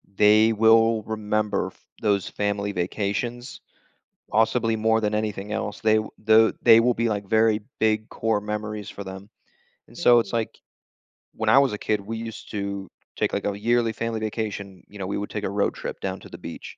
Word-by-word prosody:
they 110 +2 +5
will 115 0 +4
remember 105 -1 -1
f - - -13 0.2
those 100 -3 +1
family 100 0 -2
vacations, 105 +7 -3 0.7
possibly, 115 +1 +2
more 110 +1 +2
than 105 -1 -1
anything 105 -1 -3
else. 105 -1 -3
They 110 0 +3
w 110 0 -2
the 110 +1 +5
they 115 -2 +8
will 120 +1 +2
be, 115 +1 0
like, 100 -2 -2
very 110 0 +3 0.2
big 110 0 +1
core 110 -2 -1
memories 105 0 -5
for 100 - -8
them, 95 +1 -9 0.6
and - - -16
so, 120 -1 +5
it's 100 - -5
like 115 -2 -2 0.8
when - - -1
I - - +6
was 140 -1 +3
a - - -3
kid, 105 0 -1
we 110 +3 -5
used 115 0 -8
to 100 -2 -4 0.3
take - - 0
like - - -2
a 100 -1 -1
yearly 115 +1 +1
family 115 -1 -3
vacation, 100 -4 -5
you 105 - -12
know? 95 - -3
We 100 - -2
would 105 - -4
take 105 - -5
a - - -1
road 100 +1 0
trip - - -6
down 95 -1 -3
to - - -12
the - - -9
beach, - - -9
110 Hz, 195 wpm, -24 LUFS, 100-115 Hz, 0.8 s, they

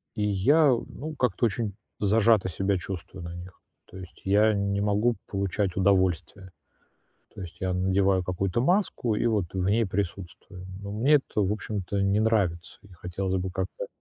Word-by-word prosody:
и 105 - -1
я, 105 +11 +4
ну, 140 +5 -3
как-то 125 -2 +1
очень 110 -1 -3 0.3
зажато 110 0 +3
себя 95 +3 0
чувствую 90 0 -7
на 85 0 -7
них. 90 +1 -11 0.3
То 95 - -13
есть 90 -3 -12
я 105 +3 +4
не 100 0 0
могу 105 +4 +2
получать 100 -1 -1
удовольствие. 95 -1 +1 0.8
То - - -9
есть 85 -1 -9
я 95 -1 -1
надеваю 95 0 +2
какую-то 90 +3 -1
маску 175 - +1
и 120 - 0
вот 105 -6 +1
в 95 -1 -1
ней 115 +3 +3
присутствую. 90 0 -5 0.2
Ну 100 0 -6
мне 140 +5 +5
это, 135 -6 +1
в 95 +1 +1
общем-то, 100 -2 -3
не 100 +2 +2
нравится, 100 -7 0
и 100 - -17
хотелось 95 +2 -3
бы 95 - -3
как-то 95 0 -4
100 Hz, 165 wpm, -27 LUFS, 95-105 Hz, 0.8 s, мне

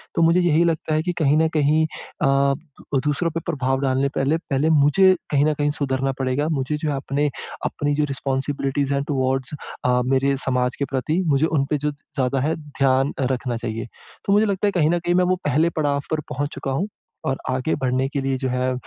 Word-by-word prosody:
तो - - +2
मुझे 165 +2 +5
यही 170 -2 +3
लगता 160 -1 0
है, 155 - +2
कि 180 - 0
कहीं 150 0 +4
न 160 +1 +4
कहीं 155 +2 +3 0.4
अ, 140 -1 +3 0.5
दूसरों 150 +3 0
पर 165 - -2
प्रभाव 135 -5 0
डालने 135 0 +1
पहले 140 +4 +2
पहले 150 -2 0
मुझे 160 +5 +5 0.2
कहीं 145 -1 +3
न 155 - +2
कहीं 145 0 0
सुधरना 135 -1 0
पड़ेगा। 135 +3 0
मुझे 150 -1 -1
जो 155 0 -2
है 145 - 0
अपने 145 +2 0 0.4
अपनी 145 -1 -1
जो 150 - +1
रिस्पॉन्सिबिलिटीज़ 140 +1 -1
टुवर्ड्स 130 -1 -1 0.3
अ, 125 0 +3
मेरे 135 +1 +2
समाज 125 -1 0
के 140 - +1
प्रति 140 +7 0
मुझे 145 0 +3
उन 155 -4 +1
पे 150 - +1
जो 150 +1 -1
ज़्यादा 135 -2 -2
है 155 +4 +1
ध्यान 135 -2 0 0.2
रखना 125 -2 -2
चाहिए। 115 -1 -4 0.4
तो 200 - +2
मुझे 210 +2 +5
लगता 200 0 0
है - - +2
कहीं 165 -5 +2
न 175 +1 +2
कहीं - - +4
मैं 180 - +4
वो 185 +1 +2
पहले 150 +4 +3
पड़ाव 145 -4 0
पर 155 - +1
पहुँच 145 +2 -2
चुका 135 - -4
हूँ, 165 +10 -1 0.4
और 135 - 0
आगे 130 +4 0
बढ़ने 130 +1 0
के 140 -1 -2
लिए 135 0 0
जो 130 0 -2
है 125 0 0
140 Hz, 210 wpm, -22 LUFS, 135-155 Hz, 0.5 s, मुझे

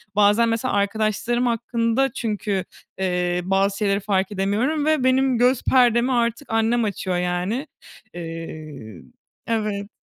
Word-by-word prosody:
bazen 210 +3 +4
mesela 230 +3 -1
arkadaşlarım 215 +4 0
hakkında 235 +2 0
çünkü, 210 -6 -2 0.3
eee, 180 -1 0
bazı 195 +1 +1
şeyleri 200 -1 +1
fark 195 -1 0
edemiyorum 220 +10 0
ve 310 -4 +2
benim 260 -1 +3
göz 250 +1 +3
perdemi 245 0 +3
artık 235 +2 0
annem 225 +1 +2
açıyor, 190 -3 -2
yani. 180 - -2 0.5
Eee, 155 - -8 0.5
evet. 210 -2 -2
215 Hz, 120 wpm, -22 LUFS, 190-240 Hz, 0.5 s, bazen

